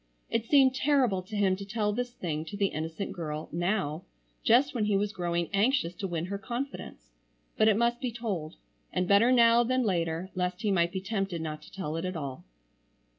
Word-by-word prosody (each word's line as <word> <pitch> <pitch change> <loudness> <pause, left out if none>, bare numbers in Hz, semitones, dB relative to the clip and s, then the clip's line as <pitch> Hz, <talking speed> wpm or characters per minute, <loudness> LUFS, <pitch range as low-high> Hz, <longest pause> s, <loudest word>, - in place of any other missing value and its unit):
It 230 0 0
seemed 270 -2 +5
terrible 260 -8 +2
to 210 +4 -9
him 195 -2 +3
to 200 - -6
tell 210 +1 -1
this 245 +2 -2
thing 155 -8 -3
to 180 +6 -7
the 200 -1 +2
innocent 160 +5 -4
girl, 155 -2 -5
now, 175 -2 -1 0.4
just 255 +5 +4
when 225 -5 0
he 205 -1 +2
was 205 +1 -1
growing 170 -3 -1
anxious 200 -3 +2
to 195 - -3
win 170 -2 -2
her 200 +2 -4
confidence, 235 - -6 0.4
but 215 - +4
it 215 -2 +4
must 235 +2 +1
be 250 -2 -1
told, 200 -9 -4 0.4
and 180 0 0
better 205 +6 +5
now 235 -1 +6
than 255 +2 +1
later 170 -2 -1
lest 180 +1 -2
he 210 - +2
might 170 -2 +2
be 190 - -3
tempted 195 -3 -2
not 155 -1 -5
to - - -15
tell 160 -5 -4
it 165 - -3
at 185 0 -3
all. 140 -4 -6
195 Hz, 205 wpm, -29 LUFS, 170-230 Hz, 0.4 s, now